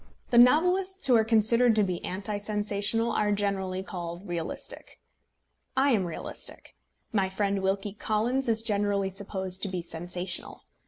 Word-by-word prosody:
The 235 - +6
novelists 360 +9 +4
who 255 - +5
are 225 - +5
considered 225 +1 +4
to 215 - +4
be 180 -3 -3
anti 200 +3 -3
sensational 210 +2 0
are 210 -1 +1
generally 195 -2 -1
called 175 0 -7
realistic. 170 -2 -5 0.8
I 275 +1 +4
am 205 -6 +2
realistic. 170 - -5 0.4
My 195 -3 +1
friend 200 0 -1
Wilkie 195 +1 -1
Collins 230 +5 0
is 225 0 +1
generally 205 -3 +1
supposed 190 -1 -2
to - - -1
be 185 -2 -4
sensational. 175 +2 -3
205 Hz, 145 wpm, -28 LUFS, 190-225 Hz, 0.8 s, The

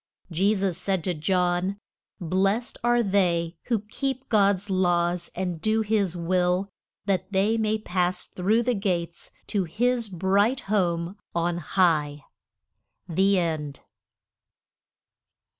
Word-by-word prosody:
Je 195 +6 +2
sus 190 -3 -1
said 190 -2 -1
to 180 - 0
John, 180 +3 0 0.4
Blest 195 +6 0
are 240 0 +3
they 175 -4 +1
who 230 -4 0
keep 265 +5 -4
God's 200 -2 +3
laws 175 -1 +1
and 180 -3 -3
do 215 +4 +2
his 205 -5 0
will, 180 +2 0 0.3
that 195 -1 -1
they 200 +3 +2
may 220 -1 +1
pass 180 -3 -1
through 210 +6 +1
the 250 +1 +1
gates 175 -5 -2 0.2
to 200 -3 -1
his 235 +5 0
bright 195 +7 +1
home 180 -2 -1 0.2
on 170 0 0
high. 150 -4 +1 0.8
THE 190 +3 +2
END. 155 -5 -2
190 Hz, 120 wpm, -25 LUFS, 175-205 Hz, 0.8 s, are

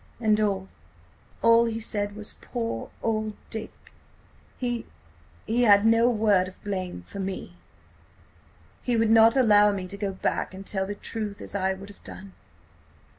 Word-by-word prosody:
"And–and 210 -4 +1 0.8
all 230 0 +6
he 225 -1 -2
said 205 -2 -2
was: 210 -1 -3
'Poor 230 - -4
old 215 -1 -1 0.2
Dick!'... 220 -1 -7 0.6
He–he 85 - -5
had 205 -3 +6
no 230 +2 +5
word 210 -5 +3
of 185 - -14
blame 185 - -4
for 200 - -9
me. 190 0 -5 1.3
He 245 -2 0
would 225 -1 +3
not 225 +2 +6
allow 210 -4 +6
me 195 -2 -3
to 200 - -7
go 200 -1 -2
back 190 - -2
and 195 +1 -9
tell 190 -1 -1
the 205 - -4
truth–as 210 -1 -5
I 190 -1 0
would 195 +1 -11
have 205 - -16
done. 190 0 -10
205 Hz, 145 wpm, -26 LUFS, 190-225 Hz, 1.3 s, all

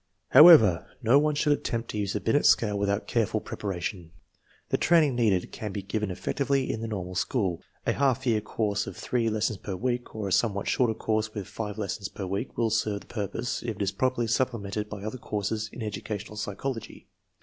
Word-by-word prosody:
However, 130 - +8 0.2
no 120 +5 +6
one 150 0 +1
should 150 0 +3
attempt 115 -4 -3
to - - -5
use 100 -1 -1
the - - -1
Binet 145 +6 +2
scale 105 -3 +4
without 100 0 0
careful 110 -2 0
preparation. 90 -4 -5 0.6
The - - +2
training 160 -5 +4
needed 105 -7 +1
can 105 -2 -5
be 100 0 -5
given 105 +1 -2
effectively 135 +8 -1
in 110 - -5
the 115 - -3
normal 90 -4 -4
school. 90 -1 -1 0.2
A - - +2
half 135 -1 +1
year 110 -4 +2
course 105 -1 -1
of - - -7
three 120 -2 0
lessons 110 -2 -1
per 100 - -5
week, 120 +4 -3
or 105 -2 -3
a - - -4
somewhat 100 0 +1
shorter 120 -3 +2
course 110 0 -1
with 100 -3 -4
five 105 -1 -5
lessons 100 -1 -3
per 100 - -6
week, 100 +7 -4
will 115 -2 +1
serve 105 -2 0
the - - -16
pur 105 -4 -3
pose 115 +5 -3
if 115 -2 -3
it 100 - -7
is 100 - 0
properly 125 +3 0
supplemented 110 -3 -1
by 100 -2 -7
other 110 +4 -5
courses 110 0 -3
in 120 - -7
educational 105 0 -5
psychology. 110 +4 -5
110 Hz, 205 wpm, -27 LUFS, 100-120 Hz, 0.6 s, However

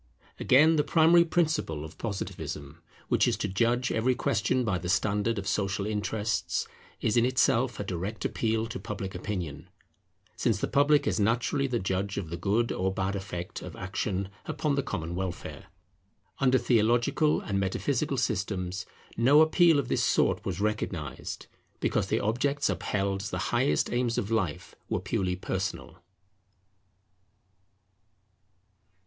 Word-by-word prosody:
Again, 155 +5 +5
the 150 - +3
primary 170 +2 +5
principle 155 - 0
of 80 - -12
Positivism, 85 -7 -5 0.3
which - - +3
is - - +1
to - - -2
judge 120 +6 +1
every 125 +3 +1
question 120 +1 +1
by 95 -5 0
the 90 +1 -5
standard 105 +3 +1
of 100 -1 -4
social 100 -1 0
interests, 105 +1 -1 0.3
is 110 +1 +1
in 120 - +5
itself 130 -2 +2
a - - -1
direct 95 +3 -4
appeal 110 0 0
to 120 +2 -6
Public 100 -2 -5
Opinion; 90 -5 -5 0.7
since - - +1
the - - -1
public 145 +1 +3
is - - 0
naturally 120 +6 +1
the 125 -2 -1
judge 95 0 -2
of 85 -5 -4
the - - -2
good 105 +7 0
or 95 +1 0
bad 95 +1 -2
effect 90 -3 -5
of - - -8
action 95 0 -3 0.2
upon 150 -2 -1
the 140 - +1
common 85 -9 -4
welfare. 90 0 -5 0.7
Under 130 -1 +4
theological 120 +6 +2
and 100 -1 -2
metaphysical 95 -1 -1
systems 95 -1 -2 0.3
no 130 +6 +5
appeal 165 0 +5
of 140 -4 0
this - - +1
sort - - +2
was - - -3
recognized; 100 -7 -3 0.3
because - - 0
the - - +1
objects 130 +4 0
upheld 95 +2 -1
as 100 - -4
the - - -3 0.2
highest 75 0 +2
aims 120 -1 0
of 105 - -2
life 95 -9 -1 0.2
were - - 0
purely 95 -1 -1
personal. 95 +1 -4
105 Hz, 145 wpm, -28 LUFS, 95-125 Hz, 0.7 s, Again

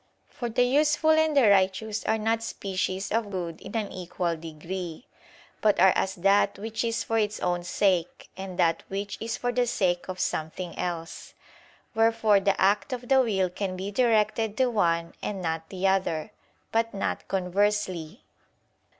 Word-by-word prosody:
For 240 - -5
the 245 +2 +2
useful 300 +4 +3
and 315 -1 +3
the 255 -5 +6
righteous 200 +2 +2
are 220 - +2
not 225 +1 0
species 190 -3 -3
of 225 -1 0
good 175 -4 -5
in - - -9
an 210 -3 -3
equal 175 -1 -3
degree, 165 +4 -7 0.6
but 210 -4 +3
are 190 +1 +6
as 190 0 0
that 200 +2 +3
which 225 +3 -3
is 230 0 -1
for 225 0 0
its 210 -1 -1
own 175 -1 -1
sake 180 -1 0
and 190 -1 -7
that 165 -1 +2
which 200 +1 -4
is 225 +1 -3
for 245 - -1
the 245 0 +1
sake 180 -5 0
of 185 -1 -6
something 165 +2 -3
else: 165 -2 -5 0.6
wherefore 225 -2 +4
the 195 0 +1
act 200 +4 +2
of 245 -1 -6
the 265 -1 +6
will 190 -7 0
can 185 0 -3
be 195 +2 -4
directed 220 -2 +1
to 255 -2 +2
one 170 -6 +1
and 200 -2 -3
not 160 -2 -3
to - - -9
the 185 - -1
other; 190 -1 0 0.4
but 230 -1 0
not 195 - -3
conversely. 190 -1 -1
200 Hz, 170 wpm, -27 LUFS, 180-225 Hz, 0.6 s, the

